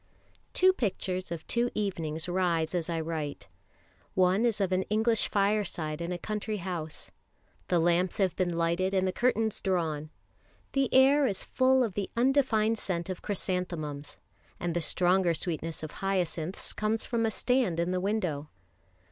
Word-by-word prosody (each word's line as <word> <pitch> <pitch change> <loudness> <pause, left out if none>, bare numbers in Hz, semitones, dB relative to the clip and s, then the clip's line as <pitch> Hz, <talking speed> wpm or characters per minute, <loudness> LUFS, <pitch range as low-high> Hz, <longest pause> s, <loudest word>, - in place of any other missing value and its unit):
TWO 370 0 +5
pictures 185 - -2
of 165 -2 -5
two 240 +1 +1
evenings 165 -6 -2
rise 175 -3 +1
as 175 -2 -1
I 165 -1 -1
write. 155 -3 -4 0.7
One 185 +4 +3
is 225 -3 +1
of 195 -2 +1
an 185 0 +2
English 220 +1 +2
fireside 195 -6 0
in 170 +1 -3
a 180 - -2
country 215 +3 -3
house. 170 -4 -5 0.6
The 175 - +2
lamps 175 +3 +2
have 190 -4 +1
been 180 -2 0
lighted, 170 +3 0
and 190 0 +2
the - - +1
curtains 225 -2 +1
drawn. 160 -5 -1 0.6
The 275 -3 +1
air 275 +2 +6
is 195 -5 -1
full 260 0 +3
of 220 -5 -2
the 200 0 -3
undefined 235 -4 +3
scent 175 -1 -2
of 185 - -6
chrysanthemums, 170 -7 -3 0.4
and 175 -1 -2
the 175 - +1
stronger 180 +1 +3
sweetness 165 -1 -3
of 155 - -5
hyacinths 185 -2 -2
comes 215 +1 -1
from 235 -1 0
a 225 - +2
stand 235 -7 +1
in 170 +1 0
the 185 0 0
window. 180 -8 -1
185 Hz, 160 wpm, -29 LUFS, 170-215 Hz, 0.7 s, air